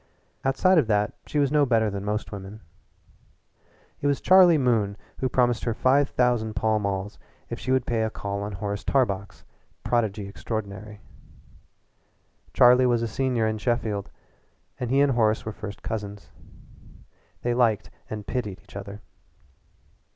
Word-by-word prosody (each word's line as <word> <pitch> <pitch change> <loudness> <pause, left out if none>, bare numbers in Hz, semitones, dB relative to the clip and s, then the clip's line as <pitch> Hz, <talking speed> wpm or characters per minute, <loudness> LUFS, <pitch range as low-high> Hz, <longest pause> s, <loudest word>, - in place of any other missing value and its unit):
Outside 160 +7 +4
of 135 - +1
that 105 -1 +1
she - - -3
was 140 -2 +2
no 150 -1 +4
better 115 -5 +2
than 100 0 -5
most 105 +2 -3
women. 100 +1 -8 1.4
It 145 - -1
was 140 -1 +1
Charlie 185 -3 +6
Moon 110 -7 +1 0.2
who 130 - 0
promised 120 -2 +1
her 115 -2 -1
five 135 +3 +3
thousand 120 -3 +1
Pall 110 -1 +1
Malls 100 0 -3 0.3
if - - -4
she 115 +7 -3
would 130 -1 +2
pay 115 -3 0
a 110 - 0
call 100 -2 -4
on 105 0 -4
Horace 100 +1 -4
Tarbox, 100 -7 -1 0.4
prodigy 110 -4 0
extraordinary. 105 0 -6 1.5
Charlie 125 +1 +6
was 120 -1 +2
a - - 0
senior 125 -1 0
in 110 0 -1
Sheffield, 110 -4 -1 0.7
and 125 - -3
he 135 +2 +3
and 145 -1 +4
Horace 110 -3 +1
were 110 - -3
first 105 -1 -8
cousins. 105 -2 -5 1.1
They 120 - +1
liked 110 -6 +1 0.2
and 105 -1 -6
pitied 105 -5 -3
each - - -18
other. 100 +1 -8
110 Hz, 150 wpm, -25 LUFS, 105-125 Hz, 1.5 s, Charlie